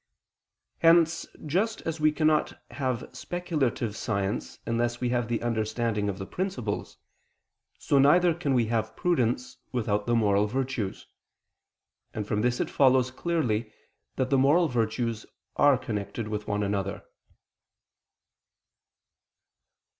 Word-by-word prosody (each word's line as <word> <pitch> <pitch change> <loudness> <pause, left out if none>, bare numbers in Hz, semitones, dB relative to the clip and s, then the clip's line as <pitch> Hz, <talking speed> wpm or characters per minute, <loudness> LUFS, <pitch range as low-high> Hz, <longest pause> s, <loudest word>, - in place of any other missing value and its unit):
Hence, 165 0 +4 0.2
just 200 +9 0
as 165 -1 -4
we 155 0 +4
cannot 155 0 +1
have 130 -1 -2
speculative 150 - -2
science 100 -3 -2
unless 120 +1 -1
we 125 - 0
have 120 -1 0
the 120 -1 -2
understanding 110 -2 -1
of 95 - -4
the 95 - -5
principles, 175 - -4 0.8
so 140 - +2
neither 170 +5 +5
can 150 -5 -1
we 120 -2 +3
have 110 -1 -1
prudence 125 -8 0
without 105 -4 -1
the 120 - +2
moral 105 -2 +3
virtues: 125 -4 -3 1.1
and 105 -2 -3
from 105 0 0
this 125 +1 +1
it - - -1
follows 130 -2 +4
clearly 125 -8 -1 0.4
that 130 0 -1
the 135 - +4
moral 155 +6 +4
virtues 115 -2 -1 0.3
are 145 -2 +5
connected 110 -2 -4
with 105 -1 -4
one 105 0 0
another. 100 -1 -2
120 Hz, 125 wpm, -27 LUFS, 110-145 Hz, 1.1 s, neither